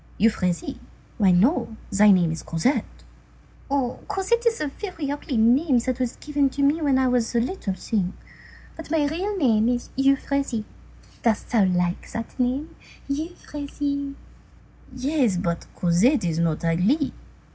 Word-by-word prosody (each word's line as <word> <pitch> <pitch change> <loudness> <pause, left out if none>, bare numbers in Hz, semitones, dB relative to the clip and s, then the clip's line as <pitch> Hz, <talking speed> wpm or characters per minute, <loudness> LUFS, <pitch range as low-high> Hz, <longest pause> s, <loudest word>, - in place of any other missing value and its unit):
"Euphrasie? 185 -5 0 0.4
Why, 200 -3 +5
no, 220 - +2
thy 210 +1 +5
name 180 -4 +5
is 160 -1 -4
Cosette." 170 - -1 0.7
"Oh! 270 -3 -1
Cosette 465 +5 0
is 460 0 +1
a 300 - -1
very 325 -3 -5
ugly 285 -3 -3
name 250 +5 +4
that 250 +2 -1
was 250 -2 -1
given 290 -2 0
to 280 +2 -2
me 295 +4 +3
when 280 -3 +3
I 260 0 +3
was 245 -1 0
a - - +4
little 230 - -2
thing. 190 -2 -2 0.6
But 325 - -9
my 310 -2 +2
real 370 +8 -2
name 230 - +3
is 245 -1 -2
Euphrasie. 275 -3 +1 0.6
Dost 225 -3 0
thou 220 -5 +4
like 180 -1 -1
that 230 +3 -6
name—Euphrasie?" 280 +1 -4 0.8
"Yes. 255 - +1
But 170 -2 -2
Cosette 185 - +3
is 165 -2 -1
not 165 -1 0
ugly." 200 - +2
255 Hz, 145 wpm, -24 LUFS, 205-290 Hz, 0.8 s, Why